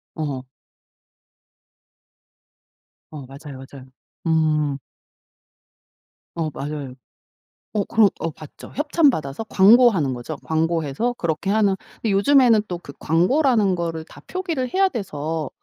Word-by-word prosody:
어. 140 -5 -4 2.6
어 145 -3 -8
맞아요 140 +1 -10
맞아요. 135 -1 -12 0.4
음. 155 -3 +1 1.6
어 160 -2 -1
맞아요. 140 -1 -5 0.8
어 205 -2 +1
그런 220 -3 +4
어 165 - -2
봤죠. 155 0 -13
협찬 295 +1 +3
받아서 155 - -3
광고하는 200 - +5
거죠. 125 +5 -6
광고해서 160 - 0
그렇게 170 -2 -2
하는 205 -2 +3 0.2
근데 220 - -2
요즘에는 235 +1 +5
또 175 - -4
그 140 - -11
광고라는 205 - +2
거를 165 -2 -3
다 - - -15
표기를 330 -10 -3
해야 385 0 +3
돼서 160 - -4
165 Hz, 235 characters per minute, -22 LUFS, 150-225 Hz, 2.6 s, 광고하는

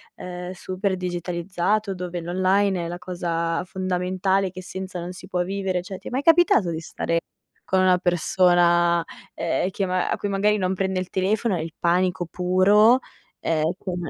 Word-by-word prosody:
ehm, 180 0 -7
super 185 +1 -3
digitalizzato 180 +3 -1
dove 180 -1 -4
l'online 185 +2 +1
è - - -3
la 175 - -5
cosa 170 -2 -2
fondamentale 185 +1 -1
che 185 - -8
senza 185 0 -6
non 175 +1 -6
si 185 0 -11
può 180 -2 -1
vivere. 190 -1 -2
Cioè, 185 +2 -7
ti - - -8
è - - -14
mai 260 +2 0
capitato 325 - +4
di 165 -1 -3
stare 165 0 -2 0.4
con 190 - +1
una 185 -1 +4
persona 175 -1 +3 0.3
ehm, 170 +2 0
che 195 +1 -2
ma 185 -1 0
a - - 0
cui - - -3
magari 205 +2 +2
non 185 -2 0
prende 190 0 -1
il 185 0 -5
telefono, 200 +3 0
e 160 - -2
il 165 -1 -7
panico 180 +1 +1
puro. 195 +7 +4 0.4
È 160 -2 0 0.2
come 175 -5 -4
185 Hz, 175 wpm, -24 LUFS, 175-190 Hz, 0.4 s, capitato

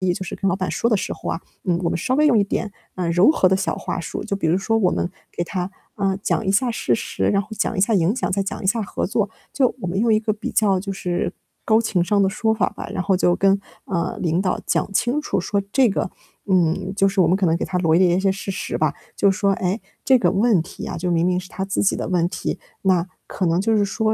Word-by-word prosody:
就 190 - -4
是 190 - -6
跟 195 - -1
老 175 - +1
板 185 -1 -2
说 235 - 0
的 220 - +3
时 195 - -2
候 - - -6
啊， 165 - -3 0.2
嗯， 175 -2 +1
我 170 - +1
们 - - -1
稍 255 - -1
微 300 +2 +4
用 240 -6 +4
一 205 - +4
点， 200 +1 -3 0.2
嗯， 180 -2 -1
柔 180 - +5
和 185 -12 +3
的 190 - +3
小 195 - -1
话 - - -4
术， 165 - -5
就 200 -3 -2
比 195 - -3
如 165 - +3
说 225 +3 +1
我 185 -5 +2
们 175 - -1 0.2
给 175 - -2
他， 180 0 -3 0.3
嗯， 195 -1 0
讲 220 - 0
一 195 - +2
下 245 +5 +2
事 135 - 0
实， 95 -4 -2
然 200 - +2
后 200 - -12
讲 - - 0
一 190 - 0
下 220 +4 +3
影 185 +3 +2
响， 255 - -1
再 195 +1 0
讲 195 - -5
一 190 - -1
下 230 - +2
合 - - -3
作。 205 0 0 0.2
就 260 -2 +2
我 180 - -3
们 190 +3 -1
用 230 0 +3
一 215 - +4
个 215 0 -1
比 210 - -5
较 200 -3 +2
就 195 +1 -4
是 180 -1 -2 0.3
高 220 0 +4
情 195 -6 +1
商 200 +3 +2
的 195 - +3
说 220 +3 0
法 215 -4 +1
吧， - - -8
然 190 - -1
后 190 -1 +2
就 175 -1 +3
跟， 195 0 +3 0.3
嗯， 170 -1 -1
领 170 -1 +1
导 185 -2 0
讲 - - 0
清 245 +8 +1
楚 300 - -1
说 200 +3 -1
这 265 +1 +4
个 195 - -2 0.4
嗯， 185 +1 +2
就 195 -1 +3
是 195 0 +2
我 - - +4
们 185 - +3
可 195 - +1
能 165 - +3
给 - - -2
他 180 - -2
罗 165 -2 +3
列 175 -1 +4
一 - - +2
些 195 0 +2
事 195 0 -4
实 190 - -3
吧， - - +1 0.2
就 200 - +4
说， 195 +1 +1
诶， 190 +3 -1 0.2
这 260 -1 +5
个 180 - +3
问 200 -2 +3
题 165 - -8
啊， - - -4
就 180 +2 -2
明 170 0 +2
明 180 0 +1
是 180 - -9
他 190 0 -5
自 195 - -1
己 200 - +2
的 - - -3
问 175 -2 +2
题， - - -4 0.2
那 185 -2 +2 0.2
可 185 - -2
能 170 +2 +2
就 220 +2 +2
是 205 - +3
说， 220 +2 0
195 Hz, 305 characters per minute, -22 LUFS, 180-210 Hz, 0.4 s, 柔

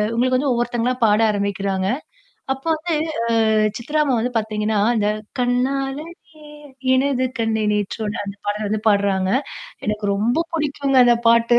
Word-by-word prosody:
உங்களுக்கு 255 +2 +2
வந்து 280 -1 0
ஒவ்வொருத்தங்களா 240 +1 0
பாட 210 0 +4
ஆரம்பிக்கிறாங்க. 200 -2 -1 0.7
அப்ப 270 0 -13
வந்து 330 +2 -3 0.6
ஆ - - +3 0.3
சித்ரா 300 +6 -1
அம்மா 275 -4 +1
வந்து 245 +2 -2
பார்த்தீங்கன்னா, 215 0 -1 0.2
அந்த 210 -1 +1 0.3
கண்ணாலே 270 +4 0 0.9
எனது 260 -1 +1
கண்ணே 225 -1 0
நேற்றோடு 210 +1 -2
அந்த 200 0 -7
பாடல 210 +1 -1
வந்து 215 +1 -1
பாடுறாங்க. 200 -2 +2 0.6
எனக்கு 210 0 -2
ரொம்ப 225 +7 +1 0.2
பிடிக்குங்க 280 -3 +1
அந்த 240 -1 +5
பாட்டு. 235 +1 +5
230 Hz, 135 wpm, -21 LUFS, 210-260 Hz, 0.9 s, அந்த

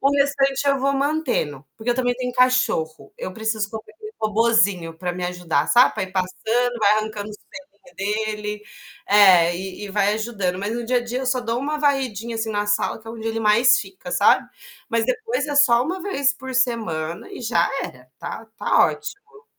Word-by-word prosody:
O 275 - +3
restante 275 0 +1
eu 275 -1 +3
vou 275 +1 +1
mantendo, 270 - -1
porque 225 +2 -2
eu - - +2
também 245 -1 0
tenho 250 0 -4
cachorro. 250 -11 +1
Eu 185 - -6
preciso 220 -1 -2
comprar 220 0 -9
aquele 430 +6 -10
robozinho 210 -6 +2
pra 180 +1 -3
me 180 - -6
ajudar, 175 -5 -1
sabe, 245 +2 +6
pra - - -3
ir 185 - -13
passando, 225 +6 -1
vai 210 -1 +4
arrancando 215 -1 -3
os 210 - -9
pelinho 265 -1 -15
dele 210 +1 -3 0.4
é, 185 -4 +6
e 190 +3 -6
e - - -7
vai 205 +1 +2
ajudando, 200 -5 -2
mas 205 +2 -3
no 240 -1 -4
dia 250 +1 +1
a - - +3
dia 245 +2 -3
eu 260 - -4
só 255 0 +1
dou 230 0 -2
uma 300 +3 -2
varridinha, 250 -6 0
assim, 225 0 -2
na 205 -1 -1
sala 205 +1 0
que 225 - -21
é - - -6
onde 225 -1 -5
ele 225 0 -2
mais 220 +3 +5
fica, 375 - -8
sabe. - - +3 0.4
Mas 230 -1 +1
depois 460 -3 -1
é 290 - -3
só 245 -5 +5
1 365 +5 -3
vez 285 -8 +1
por 260 -1 -8
semana 220 -11 -1
e - - -8
já 220 -7 +2
era. 125 0 -10
Tá 225 - -7
tá - - +4
ótimo. 425 +2 -8
225 Hz, 200 wpm, -22 LUFS, 205-260 Hz, 0.4 s, sabe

